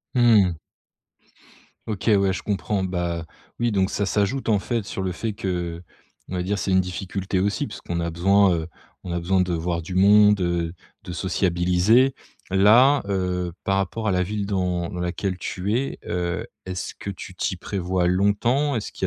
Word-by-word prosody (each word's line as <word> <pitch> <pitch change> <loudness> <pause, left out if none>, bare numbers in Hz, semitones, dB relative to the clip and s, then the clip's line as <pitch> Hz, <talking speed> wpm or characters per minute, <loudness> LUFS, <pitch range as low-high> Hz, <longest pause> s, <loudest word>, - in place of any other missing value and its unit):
Mmh 120 -3 +6
mh. 90 -2 -2 1.3
OK, 105 +1 -2
ouais 100 -1 +3
je 90 - -4
comprends. 100 -1 -1
Bah, 85 -3 -2 0.3
oui 120 0 +1
donc 95 -2 +1
ça 100 - -1
s'ajoute 105 +6 0
en 105 - +3
fait 115 +2 -2
sur 95 - -5
le 95 -1 -1
fait 110 +4 -3
que, 90 -4 -3 0.5
on 95 - -4
va 90 - -1
dire, 100 +2 -1
c'est - - -2
une 95 - +5
difficulté 95 +1 -2
aussi 100 +1 0
puisqu'on 85 0 -5
a 85 0 -2
besoin, 95 +3 +4
heu, 80 -1 -2 0.4
on 90 - -6
a 85 - -1
besoin 95 +2 +1
de 90 0 -1
voir 85 +1 -2
du 90 +3 -7
monde 105 +2 +6
heu, 85 -1 -1 0.3
de 90 - -7
sociabiliser. 90 +7 +2 0.4
Là, 115 +9 +6
heu, 90 -2 -1
par 95 0 +1
rapport 105 +3 -2
à 100 - +2
la 90 - +1
ville 100 +2 -2
dans 90 -3 -1
dans 90 - -6
laquelle 90 +1 -2
tu 95 +4 -3
es, 135 +3 -2
heu, 90 +4 -2 0.2
est-ce 90 0 -4
que - - -7
tu 95 -1 -8
t'y 95 +1 -2
prévois 90 -1 -1
longtemps? 105 +10 +2
Est-ce 110 - -3
qu'il - - -3
95 Hz, 185 wpm, -23 LUFS, 90-105 Hz, 1.3 s, Mmh